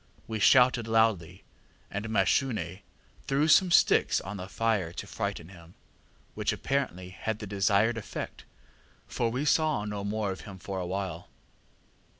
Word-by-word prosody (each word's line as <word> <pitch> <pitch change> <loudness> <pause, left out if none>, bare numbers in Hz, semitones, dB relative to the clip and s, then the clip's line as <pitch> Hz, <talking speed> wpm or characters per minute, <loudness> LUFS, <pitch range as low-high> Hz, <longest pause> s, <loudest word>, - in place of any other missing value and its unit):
We 110 -1 -3
shouted 125 +1 +5
loudly, 105 -6 +1 0.5
and 105 +3 -4
Mashune 105 -2 0 0.5
threw 140 +3 +2
some 185 +3 +5
sticks 170 - +4
on 100 +3 -7
the 90 0 -7
fire 105 -6 0
to 100 - -6
frighten 100 -5 -4
him, 85 -2 -15 0.6
which - - -1
apparently 125 -10 -2
had 110 +3 -4
the 110 - -7
desired 105 +3 +2
effect, 105 - -7 0.6
for 115 - -1
we 130 +5 -2
saw 150 -7 +2
no 105 -1 -4
more 105 0 -2
of 95 - -7
him 100 -3 -10
for 95 +1 -5
a 90 - -3
while. 90 -2 -4
105 Hz, 150 wpm, -28 LUFS, 95-115 Hz, 0.6 s, shouted